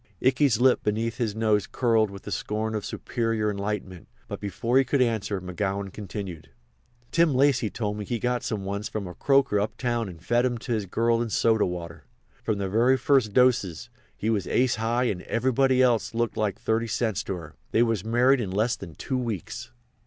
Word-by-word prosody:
Ikey's 130 -2 +3
lip 130 0 +4
beneath 110 +2 -1
his 110 -4 -1
nose 110 -2 +1
curled 115 -4 +2
with 100 0 -10
the 105 - -7
scorn 110 +4 -2
of 105 -2 -2
superior 115 -3 -1
enlightenment; 100 -3 -4 0.2
but - - -6
before 115 +6 +1
he - - +4
could 135 +2 0
answer, 110 -5 0
McGowan 95 +2 -3
continued: 95 -6 -7 0.6
"Tim 165 -5 +3
Lacy 130 -4 +3
told 105 -2 -3
me 105 - -5
he 120 - -2
got 125 +1 -1
some 100 -3 -3
once 100 +1 -3
from 105 -2 -4
a 90 - -7
croaker 135 -2 +2
uptown 115 +1 -1
and 85 -3 -11
fed 120 +8 +1
'em 125 -2 0
to 120 +2 -7
his 105 -3 -2
girl 115 +4 +1
in 120 - -2
soda 110 -1 +2
water. 85 -3 -7 0.4
From 110 - 0
the 100 -1 -2
very 120 +7 +3
first 130 -5 +2
dose 120 -5 +2 0.3
he 110 - 0
was 105 -3 -1
ace 125 -2 +2
high 115 +3 0
and 100 -7 -1
everybody 130 +3 +2
else 120 -2 +1
looked 120 0 0
like 105 -2 -1
thirty 115 +1 0
cents 110 -2 -1
to 95 - -2
her. 80 -3 -10
They 115 - +3
was 115 -5 0
married 125 +4 +3
in 100 - -3
less 110 +5 +1
than 80 - -10
two 130 -2 -2
weeks." 115 0 -5
110 Hz, 195 wpm, -26 LUFS, 100-120 Hz, 0.6 s, lip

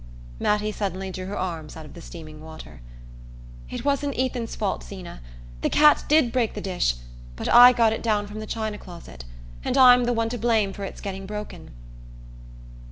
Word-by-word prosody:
Mattie 210 0 +1
suddenly 195 -2 -4
drew 185 0 -6
her 200 - -5
arms 165 -4 -5
out 160 - -9
of - - -13
the 170 - -11
steaming 155 -3 -11
water. 160 - -11 0.9
"It - - -6
wasn't 280 0 0
Ethan's 250 -2 -2
fault, 200 -3 -2
Zeena! 185 - -9 0.4
The - - +1
cat 300 0 +5
did 300 -5 +4
break 235 -3 0
the - - -4
dish; 180 - 0 0.4
but - - -5
I 245 +1 +9
got 230 -3 +3
it - - -4
down 210 -3 0
from 205 +1 -8
the 215 - -7
china 215 -2 -3
closet, 170 - -11 0.4
and - - -1
I'm 250 -2 +7
the 245 - +1
one 230 -1 0
to 245 0 -4
blame 220 -3 +1
for 200 - -6
its - - -8
getting 195 -1 -6
broken." 210 +1 -7
210 Hz, 185 wpm, -24 LUFS, 185-240 Hz, 0.9 s, I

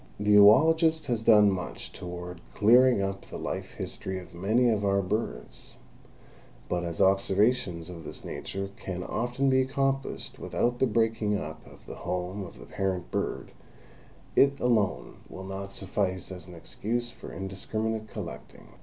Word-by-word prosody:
The 105 0 +3
oologist 160 - +6
has 120 -4 -1
done 105 -3 +6
much 95 -1 -5
toward 90 -1 -7
clearing 120 0 +5
up 95 0 -4
the - - -6
life - - -4
history 95 0 -4
of 90 - -10
many 110 +8 +2
of 110 -3 +2
our 100 0 +2
birds, 95 - -4 0.9
but 90 0 -1
as 85 -1 -4
observations 95 -2 +2
of 85 -2 -8
this - - -8
nature 95 0 -5
can 90 -1 -5
often 125 +7 -1
be 130 0 +4
accomplished 135 +1 -2
without 120 0 -1
the 130 - +4
breaking 110 -2 +1
up 80 -3 -7
of - - -17
the - - -8
home 90 +2 -3
of 90 - -10
the - - -11
parent 95 -3 -3
bird, - - -2 0.8
it 140 0 +4
alone 115 -5 +1
will 95 - -8
not 95 +1 -6
suffice 95 -1 -2
as 90 -2 -8
an 90 - -10
excuse 120 +8 -3
for - - -10
indiscriminate 110 +3 -3
collecting. - - -9
100 Hz, 155 wpm, -28 LUFS, 95-120 Hz, 0.9 s, oologist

